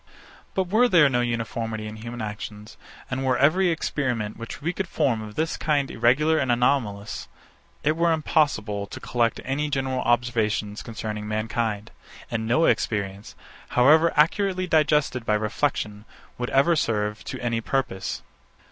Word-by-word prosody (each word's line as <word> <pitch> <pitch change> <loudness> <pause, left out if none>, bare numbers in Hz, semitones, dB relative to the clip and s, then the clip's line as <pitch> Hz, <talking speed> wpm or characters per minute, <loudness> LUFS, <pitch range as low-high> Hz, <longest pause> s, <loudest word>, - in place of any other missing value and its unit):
But 190 - +2
were 235 +5 +4
there 165 -8 +6
no 125 -2 +1
uniformity 115 -2 -3
in 110 0 -7
human 115 +1 -6
actions, 105 0 -7 0.4
and 130 +1 -2
were 130 -2 +2
every 175 +8 +4
experiment 125 -9 -1
which 115 0 -8
we 165 +5 -2
could 190 +1 -3
form 135 -9 0
of 105 -1 -9
this 160 +1 -1
kind 145 -3 0
irregular 145 +7 +3
and 130 -2 +1
anomalous, 120 -4 0 0.6
it 155 +2 +2
were 170 +1 +2
impossible 110 -10 +1
to - - -8
collect 120 -2 0
any 145 +3 -1
general 135 -2 -1
observations 115 -3 0
concerning 105 -2 -5
mankind; 110 0 -2 0.4
and 110 -1 -2
no 125 +8 +3
experience, 100 -1 -1 0.4
however 155 +6 +6
accurately 185 +4 +2
digested 150 -6 +2
by 105 -2 +1
reflection, 105 -1 -1 0.3
would 125 - -2
ever 155 +6 +4
serve 105 -6 -1
to - - -5
any 120 -2 -1
purpose. 125 -7 -2
120 Hz, 145 wpm, -25 LUFS, 110-150 Hz, 0.6 s, there